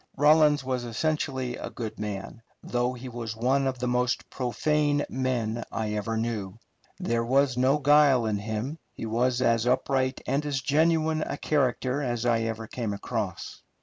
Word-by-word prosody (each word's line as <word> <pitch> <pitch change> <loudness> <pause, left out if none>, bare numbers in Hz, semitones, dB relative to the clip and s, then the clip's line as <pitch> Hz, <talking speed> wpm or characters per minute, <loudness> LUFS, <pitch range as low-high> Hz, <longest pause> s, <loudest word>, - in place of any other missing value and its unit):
Rawlins 150 0 +5
was 130 -1 -2
essentially 130 0 -2
a - - -6
good 110 -3 -6
man, 105 +2 -5 0.2
though 125 +1 0
he 125 +1 -8
was 115 -2 -5
one 135 +4 +2
of 130 -1 -2
the 125 0 -2
most 125 0 0
profane 145 +3 +1
men 120 -3 -1
I 110 -1 -2
ever 110 +2 -2
knew; 110 -4 -3 0.4
there 115 0 0
was 130 +1 +2
no 130 +3 +3
guile 145 -4 +5
in 105 -2 0
him 110 +9 -4 0.2
he - - -5
was 120 +3 +1
as 115 0 +2
upright 130 +1 +1
and 140 +2 0
as 145 -2 -1
genuine 155 +3 +2
a - - -3
character 135 -1 0
as 120 -3 -2
I 120 -1 +3
ever 115 0 -3
came 110 -2 -3
across. 100 - -4
125 Hz, 165 wpm, -27 LUFS, 115-140 Hz, 0.4 s, Rawlins